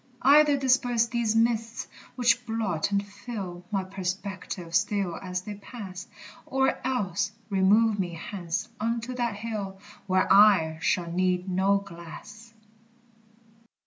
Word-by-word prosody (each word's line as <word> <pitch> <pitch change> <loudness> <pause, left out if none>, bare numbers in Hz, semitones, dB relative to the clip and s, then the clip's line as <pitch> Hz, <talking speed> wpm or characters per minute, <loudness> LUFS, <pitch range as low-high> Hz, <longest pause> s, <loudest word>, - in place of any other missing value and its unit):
Either 290 +2 +6
disperse 250 -3 +3
these 230 -2 0
mists, 230 0 +1 0.3
which 240 -1 +3
blot 205 -7 -1
and 200 0 +1
fill 205 -4 -7
My 195 -2 -1
perspective 185 -2 -5
still 195 -3 +1
as 180 -1 -4
they 210 - -6
pass; 200 -3 -9 0.4
Or 265 0 +1
else 205 -6 -1 0.2
remove 205 +3 +4
me 175 -2 -2
hence 175 +3 -4
unto 230 +3 -2
that 240 -3 -1
hill 205 -3 -5 0.3
Where 185 0 +2
I 190 -6 +6
shall 170 -1 0
need 180 +1 0
no 190 +2 +2
glass. 200 +5 -10
200 Hz, 120 wpm, -27 LUFS, 185-230 Hz, 0.4 s, Either